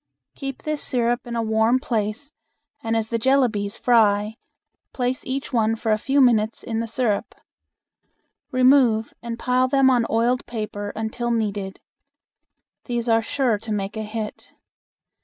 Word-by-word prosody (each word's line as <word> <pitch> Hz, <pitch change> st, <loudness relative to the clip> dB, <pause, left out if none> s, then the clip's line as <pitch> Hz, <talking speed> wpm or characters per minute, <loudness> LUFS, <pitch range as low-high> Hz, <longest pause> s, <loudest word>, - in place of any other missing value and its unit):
Keep 270 Hz, -2 st, -6 dB
this 305 Hz, -1 st, -1 dB
syrup 240 Hz, -1 st, +1 dB
in 235 Hz, -, -4 dB
a 230 Hz, -, 0 dB
warm 220 Hz, +2 st, +2 dB
place 235 Hz, +2 st, -3 dB, 0.5 s
and 225 Hz, 0 st, -1 dB
as 220 Hz, 0 st, -2 dB
the 230 Hz, -, -1 dB
jellabies 225 Hz, -6 st, +1 dB
fry 215 Hz, -3 st, +3 dB, 0.6 s
place 250 Hz, 0 st, -2 dB
each 270 Hz, +1 st, -4 dB
one 225 Hz, -1 st, +2 dB
for 225 Hz, 0 st, -2 dB
a 215 Hz, -, +3 dB
few 270 Hz, +5 st, +1 dB
minutes 230 Hz, -4 st, +3 dB
in 225 Hz, -1 st, -3 dB
the 230 Hz, -, -2 dB
syrup. 225 Hz, -2 st, -1 dB, 1.2 s
Remove 255 Hz, -4 st, +4 dB
and 235 Hz, -1 st, -5 dB
pile 255 Hz, +1 st, +1 dB
them 270 Hz, 0 st, +4 dB
on 240 Hz, -2 st, +2 dB
oiled 240 Hz, +3 st, +1 dB
paper 210 Hz, -3 st, -5 dB
until 225 Hz, +2 st, -3 dB
needed. 205 Hz, -4 st, -2 dB, 1.1 s
These 240 Hz, -1 st, -3 dB
are 225 Hz, -1 st, +4 dB
sure 235 Hz, -2 st, 0 dB
to 225 Hz, +1 st, -7 dB
make 200 Hz, 0 st, -3 dB
a 220 Hz, -, -3 dB
hit. 215 Hz, 0 st, -6 dB
230 Hz, 150 wpm, -23 LUFS, 220-250 Hz, 1.2 s, Remove